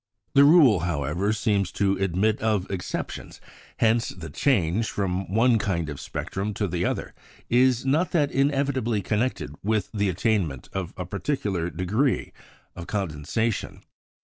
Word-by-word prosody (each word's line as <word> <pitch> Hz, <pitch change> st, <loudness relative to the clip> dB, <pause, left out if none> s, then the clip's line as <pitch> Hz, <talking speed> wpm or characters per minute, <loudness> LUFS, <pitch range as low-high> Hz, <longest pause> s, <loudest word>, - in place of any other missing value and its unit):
The 140 Hz, 0 st, +7 dB
rule, 145 Hz, -, +6 dB
however, 85 Hz, +4 st, -1 dB
seems 105 Hz, -4 st, 0 dB
to 100 Hz, -1 st, +1 dB
admit 95 Hz, +4 st, +1 dB
of 105 Hz, -4 st, +1 dB
exceptions; 95 Hz, -2 st, -5 dB, 0.4 s
hence 115 Hz, +1 st, +2 dB
the 80 Hz, -4 st, -8 dB
change 105 Hz, -, +1 dB
from 95 Hz, -2 st, -2 dB
one 115 Hz, +2 st, +4 dB
kind 85 Hz, -6 st, -1 dB
of 75 Hz, -, -6 dB
spectrum 100 Hz, +2 st, -4 dB
to 105 Hz, -, -1 dB
the 90 Hz, 0 st, -2 dB
other -, -, -2 dB, 0.4 s
is 125 Hz, +1 st, +3 dB
not 155 Hz, +7 st, +1 dB
inevitably 135 Hz, -, +1 dB
connected 105 Hz, -, -1 dB
with 110 Hz, -1 st, 0 dB
the 105 Hz, -2 st, +1 dB
attainment 90 Hz, -, -1 dB
of 95 Hz, -3 st, -3 dB
a 90 Hz, -, -4 dB
particular 100 Hz, -, -2 dB
degree 105 Hz, -, 0 dB, 0.4 s
of 85 Hz, -, -8 dB
condensation. 100 Hz, +4 st, -2 dB
100 Hz, 135 wpm, -25 LUFS, 90-120 Hz, 0.4 s, The